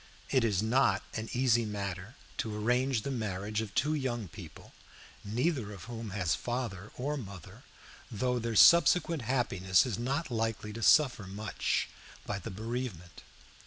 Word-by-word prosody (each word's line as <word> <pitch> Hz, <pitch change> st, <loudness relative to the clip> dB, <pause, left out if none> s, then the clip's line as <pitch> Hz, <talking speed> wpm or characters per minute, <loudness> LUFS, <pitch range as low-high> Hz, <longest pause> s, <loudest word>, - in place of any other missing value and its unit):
It 130 Hz, -3 st, +3 dB
is 105 Hz, -3 st, +1 dB
not 110 Hz, -4 st, +3 dB
an 110 Hz, 0 st, -4 dB
easy 120 Hz, -2 st, +3 dB
matter 100 Hz, +1 st, -5 dB, 0.2 s
to 110 Hz, -2 st, -2 dB
arrange 125 Hz, +2 st, +1 dB
the 140 Hz, -, -3 dB
marriage 105 Hz, -3 st, -2 dB
of 110 Hz, -3 st, -6 dB
two 150 Hz, +3 st, +2 dB
young 120 Hz, -, -2 dB
people -, -, -12 dB, 0.5 s
neither 120 Hz, +1 st, -1 dB
of 95 Hz, -4 st, -10 dB
whom 115 Hz, -1 st, -6 dB
has 95 Hz, -4 st, 0 dB
father 115 Hz, -5 st, -4 dB
or 145 Hz, +4 st, -2 dB
mother, 100 Hz, -, -9 dB, 0.5 s
though 125 Hz, +3 st, 0 dB
their 115 Hz, -1 st, -3 dB
subsequent 170 Hz, +2 st, +6 dB
happiness 100 Hz, -7 st, +2 dB
is 115 Hz, -6 st, -3 dB
not 135 Hz, +4 st, -2 dB
likely 110 Hz, -2 st, -2 dB
to 115 Hz, -, -6 dB
suffer 120 Hz, -4 st, +4 dB
much 100 Hz, +2 st, -1 dB, 0.4 s
by 100 Hz, -1 st, -3 dB
the 115 Hz, -, -7 dB
bereavement. 110 Hz, -4 st, -5 dB
115 Hz, 150 wpm, -31 LUFS, 100-125 Hz, 0.5 s, subsequent